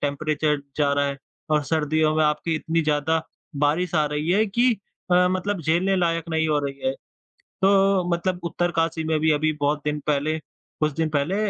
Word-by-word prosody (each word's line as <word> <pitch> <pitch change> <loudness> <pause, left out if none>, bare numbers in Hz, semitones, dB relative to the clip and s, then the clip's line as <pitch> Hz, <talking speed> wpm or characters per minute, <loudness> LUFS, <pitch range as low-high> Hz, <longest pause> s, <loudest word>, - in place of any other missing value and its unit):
Temperature 150 +1 0 0.2
जा 145 -2 +2
रहा 140 0 +1
है, 140 0 -3 0.3
और 150 -1 +3
सर्दियों 155 +1 +1
में 155 - +3
आपकी 150 +2 0
इतनी 165 +1 0
ज़्यादा 155 +2 +1 0.4
बारिश 170 +4 0
आ 155 -1 +3
रही 150 +3 -2
है 210 +4 +4
कि 240 +5 +2 0.4
अ, 180 0 +5
मतलब 185 +1 -1
झेलने 175 +5 +1
लायक 165 -2 0
नहीं 160 0 +1
हो 150 -1 +2
रही 140 0 -7
है। 130 - +2 0.7
तो 195 -1 +4
मतलब 180 +1 -1
उत्तरकाशी 165 -1 -1
में 160 -1 0
भी 160 0 +3
अभी 155 +1 +2
बहुत 145 +1 +1
दिन 150 0 -1
पहले 150 +2 +1
कुछ 155 +1 -5
दिन 160 -1 0
पहले 185 +9 0
160 Hz, 185 wpm, -24 LUFS, 150-175 Hz, 0.7 s, अ